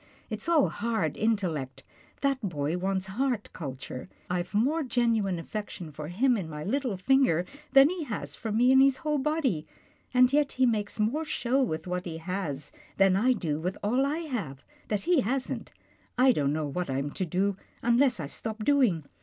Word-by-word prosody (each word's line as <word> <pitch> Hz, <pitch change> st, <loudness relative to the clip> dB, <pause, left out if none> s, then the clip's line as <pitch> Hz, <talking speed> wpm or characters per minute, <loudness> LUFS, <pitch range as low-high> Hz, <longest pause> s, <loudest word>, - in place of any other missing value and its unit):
It's 215 Hz, +9 st, -3 dB
all 320 Hz, -5 st, +5 dB
hard 205 Hz, -9 st, -1 dB
intellect. 180 Hz, -, -1 dB, 0.4 s
That 275 Hz, -2 st, +1 dB
boy 155 Hz, -6 st, -2 dB
wants 190 Hz, +1 st, -1 dB
heart 235 Hz, +3 st, -2 dB
culture. 135 Hz, -1 st, -7 dB, 0.2 s
I've 180 Hz, +2 st, -2 dB
more 280 Hz, +10 st, +2 dB
genuine 230 Hz, -, +1 dB
affection 180 Hz, -2 st, -6 dB
for 150 Hz, +1 st, -7 dB
him 240 Hz, -, +2 dB
in 175 Hz, -6 st, -4 dB
my 150 Hz, -1 st, -6 dB
little 245 Hz, -, -1 dB
finger 195 Hz, -6 st, +3 dB, 0.3 s
than 275 Hz, 0 st, +8 dB
he 355 Hz, -4 st, -4 dB
has 220 Hz, -6 st, -5 dB
for 225 Hz, -, -5 dB
me 240 Hz, +4 st, +4 dB
in 265 Hz, -, +7 dB
his 270 Hz, -1 st, +5 dB
whole 300 Hz, -1 st, -1 dB
body 265 Hz, -, 0 dB, 0.2 s
— -, -, -36 dB
and 250 Hz, +1 st, +5 dB
yet 295 Hz, -1 st, +2 dB
he 260 Hz, -, +3 dB
makes 215 Hz, -3 st, -1 dB
more 240 Hz, +10 st, +1 dB
show 265 Hz, -3 st, 0 dB
with 160 Hz, -11 st, -1 dB
what 180 Hz, 0 st, -3 dB
he 165 Hz, -2 st, -5 dB
has 160 Hz, -5 st, -4 dB, 0.3 s
than 195 Hz, -1 st, +5 dB
I 245 Hz, +6 st, +4 dB
do 155 Hz, -9 st, -2 dB
with 180 Hz, +4 st, -3 dB
all 245 Hz, +6 st, +2 dB
I 295 Hz, +4 st, -1 dB
have, 210 Hz, -, -5 dB, 0.2 s
that 210 Hz, -2 st, -1 dB
he 340 Hz, -4 st, +3 dB
hasn't. 255 Hz, +3 st, -2 dB, 0.5 s
I 255 Hz, +1 st, +6 dB
don't 145 Hz, -, +1 dB
know 155 Hz, 0 st, -1 dB
what 175 Hz, +3 st, -3 dB
I'm 135 Hz, +2 st, -2 dB
to 185 Hz, -, -2 dB
do, 195 Hz, +4 st, +1 dB, 0.3 s
unless 240 Hz, 0 st, +3 dB
I 155 Hz, -, -3 dB
stop 220 Hz, +9 st, -5 dB
doing. 245 Hz, -, +3 dB
210 Hz, 185 wpm, -28 LUFS, 170-260 Hz, 0.5 s, than